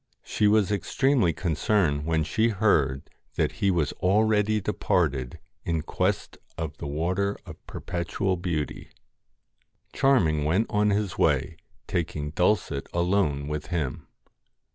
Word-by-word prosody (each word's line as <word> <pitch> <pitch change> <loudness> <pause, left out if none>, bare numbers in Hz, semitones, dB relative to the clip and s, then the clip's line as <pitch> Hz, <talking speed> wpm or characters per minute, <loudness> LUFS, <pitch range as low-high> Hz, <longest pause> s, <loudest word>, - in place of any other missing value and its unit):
She 105 - +1
was 105 -1 +3
extremely 120 0 +2
concerned 80 -2 0
when 80 -1 +1
she 110 +9 +1
heard 80 -11 +1 0.3
that - - +1
he 100 - +3
was 85 -5 +1
already 105 +2 +3
departed 65 -9 -1 0.3
in 80 -3 -1
quest 95 +4 -2 0.2
of 80 -2 -4
the - - -6
Water 90 +7 -1
of - - -11
Perpetual 90 +2 -2
Beauty. 85 -5 -3 1.0
Charming 85 - +3
went 90 +9 +2
on 105 0 +2
his 100 -3 -1
way - - +2 0.3
taking 75 -4 -3
Dulcet 90 -5 0
alone 85 -5 +1
with 75 0 -4
him. 80 -8 -3
90 Hz, 120 wpm, -26 LUFS, 75-105 Hz, 1.0 s, was